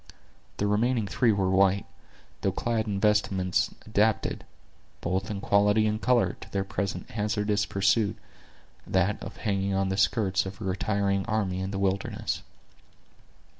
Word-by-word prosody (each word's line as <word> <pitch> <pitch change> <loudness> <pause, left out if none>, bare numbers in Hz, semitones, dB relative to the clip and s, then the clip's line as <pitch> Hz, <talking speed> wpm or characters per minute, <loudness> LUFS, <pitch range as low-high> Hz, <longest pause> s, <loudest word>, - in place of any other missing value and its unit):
The 100 - 0
remaining 110 +3 +1
three 115 +3 +2
were 95 -2 +1
white, 95 +1 +3 0.6
though 95 - +1
clad 115 +2 -1
in 100 -2 -1
vestments 100 -3 +1
adapted, 110 0 +1 0.6
both 95 +3 -2
in 105 -2 -3
quality 105 +2 +3
and 110 0 -1
color, 125 -2 +2
to - - -10
their 100 -1 0
present 100 0 -4
hazardous 105 -1 0
pursuit—that 95 - -1
of 100 - -8
hanging 100 -2 -1
on 95 0 +1
the 95 - -1
skirts 95 -2 +2
of 95 0 -8
a - - -6
retiring 100 +1 0
army 100 -4 0
in 95 0 -3
the 100 - -4
wilderness. 95 0 -1
100 Hz, 140 wpm, -27 LUFS, 95-105 Hz, 0.6 s, white